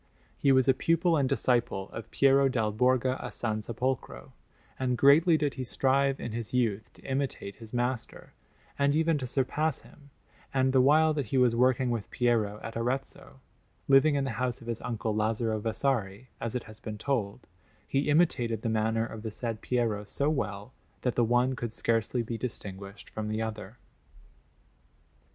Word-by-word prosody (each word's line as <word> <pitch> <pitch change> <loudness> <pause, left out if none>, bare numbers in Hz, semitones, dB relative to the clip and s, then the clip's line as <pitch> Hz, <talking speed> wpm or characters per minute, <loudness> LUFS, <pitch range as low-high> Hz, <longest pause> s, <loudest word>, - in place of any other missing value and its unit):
He 140 - +2
was 130 -2 +4
a 135 - +6
pupil 165 +5 +2
and 140 -4 +1
disciple 120 -6 0
of 115 - -8
Piero 135 0 +4
dal 110 -4 0
Borgo 130 +3 +2
a 125 - -6
San 110 -2 -2
Sepolcro, 125 +4 -3 0.5
and 125 -2 0
greatly 155 +5 +6
did 145 -2 -1
he 130 - -4
strive 135 +2 +1
in 120 - -5
his 115 +2 -4
youth 110 -4 0
to - - -19
imitate 135 -7 -3
his 110 -2 -11
master, 120 0 -3 0.5
and 140 +1 +3
even 160 -1 +2
to 130 - -4
surpass 140 +4 0
him; 145 -1 -18 0.5
and 130 0 +2
the 130 - +5
while 155 +4 +5
that 145 -5 -2
he 130 - -1
was 125 -2 +4
working 125 0 +2
with 115 -4 -3
Piero 115 -4 0
at 115 - -7
Arezzo, 115 - -4 0.5
living 140 +2 +5
in 140 - +1
the 135 - -2
house 125 -2 -1
of - - -13
his 115 -1 -4
uncle 110 -2 -2
Lazzaro 110 +1 0
Vasari, 115 -1 -1
as 115 +1 -4
it 125 - -2
has 110 -1 -13
been 110 -2 -6
told, 115 -3 -2 0.4
he 140 +2 0
imitated 120 -8 +2
the 115 - 0
manner 110 +1 +1
of 110 -1 -8
the 110 - -4
said 115 0 -4
Piero 115 -5 0
so 140 +8 -1
well 105 -5 -3 0.3
that 125 - +1
the 120 - +2
one 120 +3 +2
could 120 -2 -4
scarcely 115 +1 0
be 115 0 -5
distinguished 100 -4 -6
from 110 -1 -5
the 110 +1 -1
other. 110 0 -6
120 Hz, 180 wpm, -29 LUFS, 110-135 Hz, 0.5 s, a